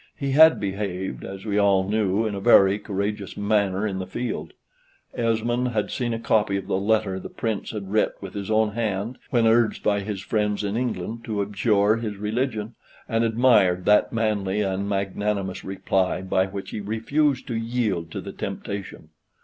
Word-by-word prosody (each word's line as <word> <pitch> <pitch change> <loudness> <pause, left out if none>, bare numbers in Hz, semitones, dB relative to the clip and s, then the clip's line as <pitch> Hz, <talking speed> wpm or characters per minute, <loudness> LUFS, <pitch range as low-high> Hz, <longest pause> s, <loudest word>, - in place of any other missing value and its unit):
He 140 -1 -2
had 160 +3 +7
behaved, 95 -2 -3
as 95 +1 -8
we 105 -1 +1
all 100 -2 +3
knew, 105 0 +1
in 110 - -2
a 100 - -3
very 100 -2 +5
courageous 100 -1 -3
manner 100 -1 +1
on 95 -2 -3
the 95 - -5
field. 95 -7 -4 0.6
Esmond 120 +2 0
had 110 -4 -1
seen 120 -2 -2
a 115 - -1
copy 105 -3 +1
of 95 - -5
the 95 - 0
letter 105 -2 +1
the - - -8
Prince 110 -4 -3
had 100 -3 -6
writ 110 0 +2
with - - -8
his 100 -1 -5
own 110 -1 +2
hand 110 +1 -2
when 120 -3 +2
urged 115 0 +3
by 100 -1 +2
his 100 0 -4
friends 105 +1 -1
in 100 +1 -2
England 115 -2 -3
to 105 -3 -1
abjure 105 +1 +2
his 110 -3 -4
religion, 110 +1 -2 0.3
and 115 0 +1
admired 110 -6 +3
that 105 0 +4
manly 105 -3 0
and 100 0 -1
magnanimous 100 -1 -2
reply 95 -1 -1
by 95 0 +1
which 95 0 -7
he - - -4
refused 130 +7 0
to 120 - -4
yield 115 -7 -1
to - - -5
the - - -8
temptation. 100 -5 -6
105 Hz, 180 wpm, -24 LUFS, 95-115 Hz, 0.6 s, had